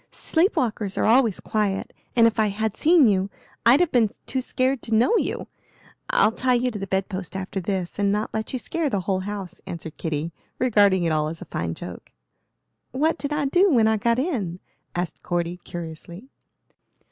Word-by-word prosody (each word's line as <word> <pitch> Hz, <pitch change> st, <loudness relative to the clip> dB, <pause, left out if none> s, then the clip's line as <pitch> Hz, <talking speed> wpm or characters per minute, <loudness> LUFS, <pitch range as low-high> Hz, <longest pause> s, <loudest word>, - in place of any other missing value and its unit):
Sleep 340 Hz, +5 st, +1 dB
walkers 210 Hz, -5 st, -1 dB
are -, -, +2 dB
always 230 Hz, -3 st, +4 dB
quiet, 205 Hz, -3 st, -1 dB, 0.2 s
and 230 Hz, -2 st, +6 dB
if 230 Hz, -1 st, +2 dB
I 215 Hz, -, +4 dB
had 215 Hz, +1 st, -2 dB
seen 320 Hz, -4 st, +5 dB
you 195 Hz, -1 st, +2 dB, 0.4 s
I'd 260 Hz, +7 st, +7 dB
have 355 Hz, -, +2 dB
been 230 Hz, -4 st, +3 dB, 0.2 s
too 260 Hz, -, -2 dB
scared 255 Hz, 0 st, 0 dB
to 225 Hz, -, -1 dB
know 245 Hz, -, +4 dB
you. -, -, -2 dB, 0.6 s
I'll -, -, +4 dB
tie 255 Hz, +2 st, +1 dB
you 250 Hz, +1 st, +1 dB
to 210 Hz, -, -6 dB
the 195 Hz, -, -4 dB
bed 190 Hz, 0 st, 0 dB
post 185 Hz, -2 st, -6 dB
after 190 Hz, +1 st, -3 dB
this, 185 Hz, 0 st, -3 dB
and 200 Hz, -1 st, +2 dB
not 210 Hz, +2 st, -1 dB
let 220 Hz, 0 st, -3 dB
you 260 Hz, -, -1 dB
scare 320 Hz, +4 st, -2 dB
the 200 Hz, -6 st, -1 dB
whole 190 Hz, +1 st, 0 dB
house," 195 Hz, -2 st, -6 dB
answered 165 Hz, -2 st, -7 dB
Kitty, 160 Hz, +1 st, -3 dB, 0.2 s
regarding 205 Hz, -7 st, +4 dB
it 165 Hz, -, +1 dB
all 155 Hz, -1 st, +1 dB
as 160 Hz, +1 st, -6 dB
a -, -, -8 dB
fine 80 Hz, 0 st, -3 dB
joke. -, -, -9 dB, 0.8 s
"What 305 Hz, +6 st, +1 dB
did 285 Hz, -, -3 dB
I 295 Hz, -1 st, 0 dB
do 360 Hz, +8 st, +4 dB
when 230 Hz, -5 st, +4 dB
I 220 Hz, 0 st, +3 dB
got 235 Hz, +2 st, +1 dB
in?" 230 Hz, -, -2 dB, 0.4 s
asked 175 Hz, -2 st, -3 dB
Cordy, 175 Hz, 0 st, -2 dB
curiously. 175 Hz, +6 st, -8 dB
210 Hz, 195 wpm, -24 LUFS, 185-255 Hz, 0.8 s, I'd